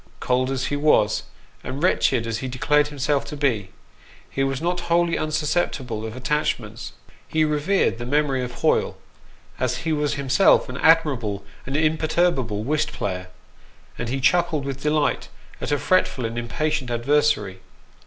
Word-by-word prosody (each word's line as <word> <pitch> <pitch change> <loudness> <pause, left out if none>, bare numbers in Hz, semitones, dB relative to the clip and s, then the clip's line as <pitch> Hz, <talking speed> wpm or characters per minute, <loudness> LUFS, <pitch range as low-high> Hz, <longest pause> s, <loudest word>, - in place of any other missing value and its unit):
Cold 130 +1 +1
as 135 -1 -1
he 145 - -1
was, 145 -8 +2 0.4
and 140 +5 -5
wretched 130 -9 +2
as 115 -1 -3
he 130 - -4
declared 145 +4 +2
himself 145 -1 0
to 150 - -7
be, 120 -9 0 0.6
he 135 - -2
was 135 -1 -1
not 175 +2 -1
wholly 170 0 +3 0.2
susceptible 145 -7 -1
of 110 - -8
attachments. 115 -6 -2 0.3
He 155 -1 +2
revered 150 -1 +1
the 120 - -5
memory 140 -2 +1
of 125 - -4
Hoyle, - - +2 0.6
as 125 -1 0
he 160 - +1
was 150 -1 0
himself 140 +6 +4
an 125 - -5
admirable 130 -13 +2 0.2
and 135 +2 -1
imperturbable 155 -8 +1
whist 150 +4 0
player, 90 -2 -4 0.7
and 120 - -4
he 135 +2 -1
chuckled 155 +1 +2
with 140 -1 -5
delight 150 0 0 0.3
at - - -3
a 145 - +3
fretful 140 -7 +1
and 115 +1 -4
impatient 130 +4 -2
adversary. 120 -5 +1
140 Hz, 155 wpm, -23 LUFS, 120-155 Hz, 0.7 s, himself